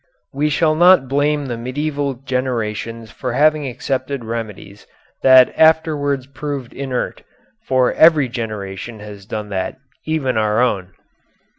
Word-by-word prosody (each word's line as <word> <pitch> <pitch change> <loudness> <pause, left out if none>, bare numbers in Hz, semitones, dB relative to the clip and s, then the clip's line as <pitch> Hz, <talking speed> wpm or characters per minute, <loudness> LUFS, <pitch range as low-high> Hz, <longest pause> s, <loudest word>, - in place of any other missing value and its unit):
We 145 +2 0
shall 155 +1 +2
not 175 -3 +5
blame 145 +2 0
the 120 -3 -4
medieval 140 +2 -2
generations 115 -3 -3
for 125 +1 -4
having 150 +1 +3
accepted 130 0 -3
remedies 110 -3 -7 0.3
that 130 -1 +6
afterwards 150 -4 +2
proved 140 -2 -6
inert, 130 -3 -4 0.5
for 130 -1 +2
every 160 -4 +5
generation 110 -2 -6
has 105 -2 -11
done 105 -1 -5
that, 95 -2 -3 0.3
even 140 -6 0
our 110 0 +1
own. 100 -7 0
130 Hz, 125 wpm, -19 LUFS, 115-145 Hz, 0.5 s, that